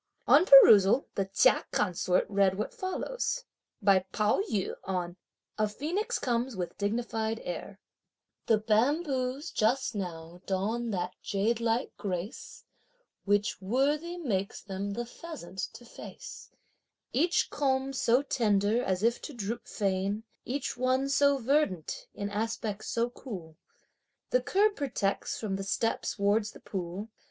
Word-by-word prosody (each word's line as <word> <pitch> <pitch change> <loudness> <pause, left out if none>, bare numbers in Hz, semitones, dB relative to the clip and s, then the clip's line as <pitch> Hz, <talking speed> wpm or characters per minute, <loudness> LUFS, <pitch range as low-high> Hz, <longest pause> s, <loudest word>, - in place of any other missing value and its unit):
On 320 +6 +6
perusal, 225 -3 +8
the 195 - 0
Chia 195 +1 +4
Consort 180 -2 +1
read 195 -2 +2
what 215 - -3
follows. 485 +4 -3 0.4
By 195 -1 +6
Pao 210 - +2
yü, 195 -3 -1
on: 180 -2 -3 0.4
"A 215 - +3
phoenix 355 - -2
comes 240 0 -1
with 180 -2 -4
dignified 220 +1 -1
air:" 185 +3 -6 0.7
The 225 - +5
bamboos 255 +5 0
just 245 +4 +1
now 175 -3 -6
don 220 +5 -1
that 180 -3 -2
jadelike 230 +4 0
grace, 190 +1 -5 0.6
Which 205 +1 +1
worthy 290 - 0
makes 200 - -2
them 200 0 -4
the 240 +3 -3
pheasant 240 - -9
to 240 - -12
face; - - -10 0.6
Each 335 +7 +2
culm 270 -1 0
so 255 0 +3
tender 215 -3 +2
as 190 -1 -1
if 235 +1 +2
to 295 - -7
droop 230 +2 -4
fain, 200 +1 -1 0.2
Each 265 +3 -3
one 255 +2 +1
so 280 0 +4
verdant, 255 - 0
in 200 0 -4
aspect 215 0 -3
so 235 +1 -1
cool, 180 - -8 0.8
The - - +3
curb 410 +2 +2
protects, 240 -9 -2
from 200 -3 -2
the 195 - -4
steps 215 +5 -1
wards 205 +1 +1
the - - -13
pool. 190 +3 -5
220 Hz, 130 wpm, -29 LUFS, 195-265 Hz, 0.8 s, perusal